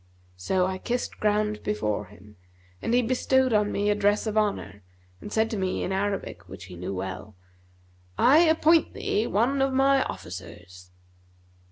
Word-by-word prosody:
So 180 - 0
I 185 0 -3
kissed 245 +3 -3
ground 210 0 0
before 105 - -2
him, 105 +2 -17 0.5
and - - -2
he 245 +1 +3
bestowed 260 +1 +2
on 210 -1 +2
me 205 +1 +1
a - - +4
dress 205 +1 +1
of 215 -1 -3
honour 200 - -1 0.4
and 210 - -9
said 220 +1 +2
to 220 - -2
me 190 -1 -1
in - - -3
Arabic 190 - -3
(which 95 -1 -10
he 90 -1 -11
knew 90 +2 -5
well), 95 +2 -6 0.8
'I 280 +5 +6
appoint 325 -1 +3
thee 215 +3 -1
one 250 +7 +1
of 270 0 +1
my 270 +1 +4
officers.' 90 0 -9
205 Hz, 165 wpm, -26 LUFS, -, 0.8 s, I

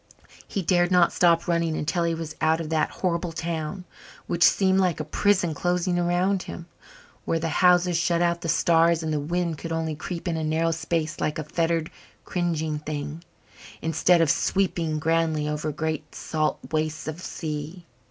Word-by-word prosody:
He 195 - -3
dared 175 0 +3
not 180 -2 +4
stop 170 -1 +3
running 170 -2 +1
until 170 +3 0
he 165 0 0
was 160 -1 -6
out 160 +1 +3
of 160 -2 -4
that 160 -1 +1
horrible 175 -2 -2
town, 165 +2 -4 0.4
which 175 -1 -3
seemed 190 -1 +4
like 180 -4 +1
a - - -1
prison 180 +1 +1
closing 175 +2 0
around 180 +2 +1
him, 170 - -8 0.6
where 165 - 0
the 165 0 -2
houses 180 -1 +5
shut 170 0 +1
out 170 0 +1
the 165 - -3
stars 165 0 +3
and 155 -1 -1
the 150 - 0
wind 170 +1 -2
could 165 - -6
only 160 -1 -1
creep 170 +3 -6
in 165 -2 -1
a 160 - -2
narrow 160 +2 +1
space 160 -1 -2
like 150 - -1
a 155 - -3
fettered, 165 +1 -1 0.3
cringing 160 -4 -1
thing, 150 +1 -5 0.6
instead 165 +2 +3
of 165 - +4
sweeping 170 -5 0
grandly 160 -1 +1
over 150 0 -2
great 155 0 -4
salt 155 -1 -1
wastes 155 0 -2
of 155 +3 -5
sea. 160 +1 -5
165 Hz, 175 wpm, -25 LUFS, 155-175 Hz, 0.6 s, houses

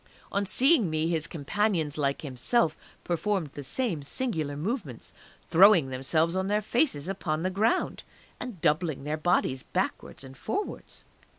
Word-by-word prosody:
On 200 0 0
seeing 260 - +4
me 155 +1 0
his 165 -1 -1
companions, 165 -1 -1
like 140 -1 -1
himself, 150 - +1 0.3
performed 175 -1 -1
the 145 - -8
same 180 - -2
singular 155 - -2
movements, 160 - -4 0.3
throwing 175 -4 +6
themselves 155 +6 +1
on 190 0 0
their 210 +1 +1
faces 225 - +1
upon 165 -5 -2
the 185 - 0
ground, 215 +5 +1 0.4
and 245 -8 -6
doubling 155 -2 +1
their 150 +2 -2
bodies 155 -5 +1
backwards 130 - -3
and 135 0 -11
forwards. 400 - -5
165 Hz, 140 wpm, -28 LUFS, 145-205 Hz, 0.4 s, throwing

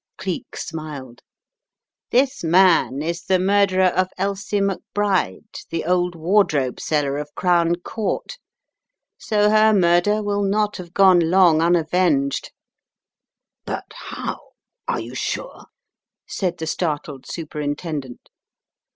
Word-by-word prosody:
Cleek 185 -3 -5
smiled. 145 -6 -7 0.9
"This 260 -1 +1
man 165 -5 +3
is 170 +2 -3
the 190 - +3
murderer 190 0 +3
of 185 +1 0
Elsie 200 +1 -2
McBride, 195 - -2
the 165 -1 -3
old 180 0 +1
wardrobe 160 -6 +1
seller 145 -2 -1
of 150 0 -6
Crown 170 -1 +2
Court, 215 - -4 0.8
so 210 -1 +2
her 215 0 +5
murder 185 +3 +3
will 205 0 -1
not 210 +1 0
have 180 -1 -10
gone 190 -2 +6
long 175 -3 +5
unavenged!" 165 -4 +1 1.1
"But - - -6
— - - -13 0.2
how - - -4 0.3
— - - -63
are - - -1
you 115 +2 -7
sure?" - - -4 0.6
said 180 -2 -2
the 160 - -4
startled 150 -4 -3
Superintendent. 150 -4 -5
175 Hz, 115 wpm, -21 LUFS, 155-195 Hz, 1.1 s, gone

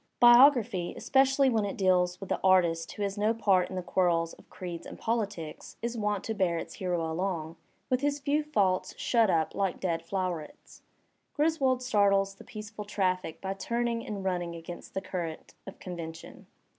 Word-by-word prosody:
Biography, 240 -7 +6
especially 270 0 +3
when 225 -4 +2
it 200 - -3
deals 180 -2 +2
with 195 - -8
the - - 0
artist 170 -3 +3
who 205 - -4
has 200 +1 -2
no 215 +2 +2
part 195 -5 +2
in 190 - -6
the 185 - -3
quarrels 170 -3 +1
of - - -18
creeds 175 -2 -7
and - - -9
politics, 205 -9 -3
is 235 0 -2
wont 210 -3 -1
to 220 - -2
bear 185 -5 +1
its - - -6
hero 175 -3 -2
along 165 -2 -3 0.4
^'with 255 - +3
his 290 0 +1
few 290 +2 +1
faults 205 -12 0
shut 230 -4 +2
up 160 -3 +1
like 195 -2 -1
dead 170 -3 -1
flowerets." 180 -5 -5 0.5
Griswold 290 -5 +2
startles 200 -4 +3
the 195 - -14
peaceful 215 -1 -8
traffic 185 -5 -1
by 195 0 -2
tiuning 235 +3 -2
and 200 -2 -5
running 175 -2 -2
against 170 +1 -9
the 190 - -1
cur 185 -2 -3
rent 160 -1 -9
of 195 - -8
convention. 165 -2 -8
195 Hz, 180 wpm, -29 LUFS, 175-230 Hz, 0.5 s, Biography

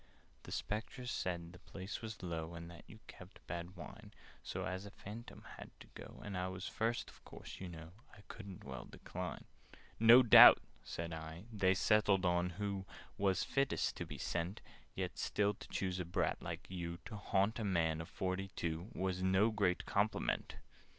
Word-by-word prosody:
"The - - -11
Spectres 120 +4 -3
said 85 -1 -3
the 90 - -12
place 95 +1 -7
was 110 -3 -7
low, 85 -1 -4
And 85 0 -8
that 85 - -12
you 110 - -12
kept 90 +1 -13
bad 85 +1 -5
wine: 90 - -10 0.3
So, - - -4
as 95 +1 -3
a - - -7
Phantom 105 +3 -9 0.2
had - - -8
to - - -12
go, - - -10
And 100 -2 -4
I 90 0 -1
was 95 +1 -5
first, 115 +1 -1
of - - -20
course, - - -10
you 95 - -5
know, 80 -1 -9 0.2
I 100 - -15
couldn't 100 -4 -9
well 65 -2 -7
decline." - - -6 0.5
"No 115 +3 +9
doubt," 120 - +11 0.3
said 85 0 -5
I, 80 +2 -7
"they 95 -2 +3
settled 100 -2 +4
who 95 +3 0 0.3
Was 95 -2 +2
fittest 135 0 +1
to - - -4
be - - -7
sent 85 +3 -2 0.3
Yet - - -3
still 105 0 +1
to - - -12
choose 95 -1 -2
a 90 - -2
brat 85 - 0
like - - -5
you, 85 -2 -4
To 110 - -7
haunt 100 +2 +1
a - - -1
man 80 -5 +1
of 80 - -8
forty 95 +1 -2
two, 85 +4 -3
Was 95 0 -1
no 95 +4 +4
great 100 -4 +1
compliment!" 105 +2 0
95 Hz, 180 wpm, -37 LUFS, 85-105 Hz, 0.5 s, doubt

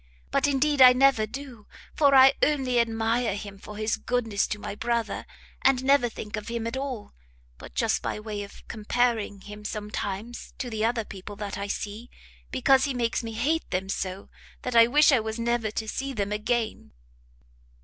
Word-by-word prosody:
But - - +2
indeed 285 0 +2
I 250 -1 +10
never 255 -4 +4
do; 255 -3 -9 0.3
for 280 -2 +4
I 265 +1 +8
only 265 -5 +2
admire 225 -1 +1
him 200 -1 -8
for 210 +1 -10
his 215 0 0
goodness 225 -5 0
to 210 - -3
my 205 - -6
brother, 235 +1 -2 0.3
and 260 -1 +3
never 270 -2 +4
think 215 -2 -6
of 210 -1 -6
him 235 -1 -3
at 230 +2 -3
all, 265 -5 -5 0.5
but - - -12
just - - +1
by - - -3
way 215 -1 -5
of 200 - -11
comparing 220 -2 -1
him, 210 +1 -10
sometimes, 210 +1 -5
to 245 -3 -4
the 220 -1 -2
other 230 -1 0
people 200 +1 -9
that 205 -1 -5
I 200 0 -4
see, 215 +4 -5 0.4
because 265 +1 +3
he 275 -3 -2
makes 235 -2 0
me 225 -1 -6
hate 295 +9 0
them 190 +1 -2
so, 190 0 -4 0.3
that 250 -1 -3
I 230 0 +8
wish 295 +5 +5
I 265 - +5
was 220 +1 -4
never 235 -1 0
to 220 +1 -4
see 270 +4 -3
them 205 -3 -2
again." 215 - -2
230 Hz, 185 wpm, -26 LUFS, 210-255 Hz, 0.5 s, I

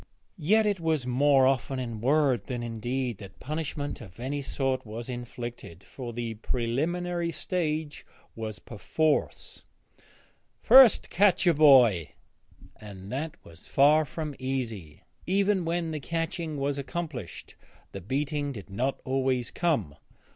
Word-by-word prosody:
Yet 215 +8 +3
it 205 -3 0
was 160 -5 0
more 135 +2 +4
often 130 0 +1
in 115 -4 -5
word 135 -5 +2
than 120 -2 -4
in 115 -1 -5
deed 125 -1 -2
that 95 -2 -12
punishment 150 -1 -4
of 95 -2 -13
any 140 +4 -3
sort 135 -1 -1
was 115 +3 -7
inflicted, 120 -7 -7
for 125 -3 -8
the 115 -1 -4
preliminary 170 +10 -2
stage 155 -5 -3 0.3
was 110 -2 -5
perforce, 150 +8 -2 1.0
'first 260 -4 +7
catch 195 0 +3
your 175 - +5
boy,' 125 - +5 0.6
and 100 -2 -10
that 145 +5 -3
was 85 +1 -13
far 150 +3 +5
from 150 +1 -5
easy. 115 - -4 0.2
Even 195 0 +2
when 165 0 -1
the 155 - -3
catching 165 0 -3
was 140 0 -1
accomplished 140 - -6 0.4
the 95 - -7
beating 145 - -2
did 105 -6 -9
not 130 +7 -1
always 130 -2 0
come. 140 - 0
135 Hz, 135 wpm, -28 LUFS, 120-155 Hz, 1.0 s, first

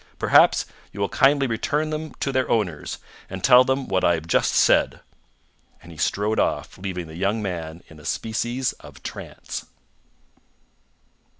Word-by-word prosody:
Perhaps - - +5 0.3
you 100 - -10
will 100 - 0
kindly 140 +1 +3
return 145 +6 -1
them 155 0 -5
to 135 - -2
their 130 -1 0
owners, 90 -10 -1 0.3
and 95 -1 -7
tell 125 0 +8
them 130 +1 -1
what 95 - 0
I 85 - +4
have 80 -1 -6
just 80 - +1
said." - - +3 0.8
And 85 - -12
he 80 - -13
strode 105 +2 0
off, - - -1
leaving 90 -2 -4
the 80 - -11
young 100 +5 0
man 85 -5 -5
in 80 - -15
a - - -15
species 120 +3 -2
of - - -14
trance. - - -7
105 Hz, 160 wpm, -23 LUFS, 90-130 Hz, 0.8 s, tell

